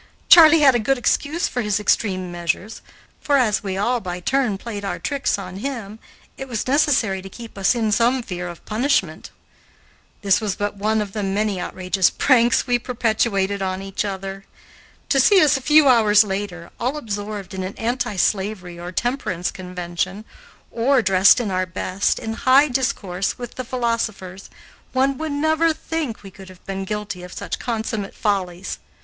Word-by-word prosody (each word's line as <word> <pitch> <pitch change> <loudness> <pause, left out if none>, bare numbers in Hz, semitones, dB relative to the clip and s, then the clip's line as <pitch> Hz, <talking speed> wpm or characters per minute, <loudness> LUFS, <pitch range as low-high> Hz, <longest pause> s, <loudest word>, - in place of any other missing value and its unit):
Charley 325 -2 +9
had 275 -3 +7
a 240 - +2
good 270 +5 +1
excuse 295 +6 0
for 245 - -3
his 210 -2 0
extreme 185 -3 0
measures, 175 +5 -3 0.4
for, 285 -2 +2
as 220 -6 +2
we 190 -2 -4
all 240 +5 +1
by 180 -4 -5
turn 240 +1 0
played 205 -1 -7
our 195 - -3
tricks 280 -6 -1
on 185 -2 -7
him, 220 -3 -5 0.4
it 270 - -6
was 235 -3 -3
necessary 255 -9 +2
to 195 - -10
keep 230 +3 -11
us 195 +4 +2
in 220 -3 0
some 240 +4 +2
fear 180 -4 -5
of 175 -1 -10
punishment. 245 +7 -1 0.9
This 195 +1 +3
was 205 -3 -2
but 205 0 -2
one 215 +2 0
of 205 -2 -5
the 210 - -4
many 200 -1 -1
outrageous 185 0 0
pranks 250 -2 +3
we 245 -1 +1
perpetrated 220 -5 0
on 190 0 -3
each 195 +1 -3
other. 195 -1 -5 0.7
To 275 - +3
see 385 +9 +6
us 300 -5 +5
a 270 - -2
few 300 +2 +5
hours 220 -4 +6
later, 190 -4 -5
all 255 +5 -1
absorbed 205 -6 -5
in 190 - -4
an 185 +1 -5
anti 235 -2 -2
slavery 190 -2 -1
or 175 +1 -6
temperance 185 -6 -2
convention, 180 +2 -5 0.5
or 250 +2 +2
dressed 190 +2 +5
in 220 -5 -2
our 185 0 -1
best, 185 +1 -1
in 225 - -4
high 265 +5 +4
discourse 230 -8 -1
with 245 -1 -7
the 255 - -5
philosophers, 230 -6 -3 0.4
one 265 0 +1
would 315 -1 -3
never 315 +3 +2
think 310 -8 -4
we 195 - -10
could 190 0 -13
have 185 -1 -16
been 195 0 -4
guilty 210 -2 -5
of 180 0 -10
such - - -5
consummate 220 -4 -3
follies. 190 -4 -2
210 Hz, 175 wpm, -21 LUFS, 190-250 Hz, 0.9 s, Charley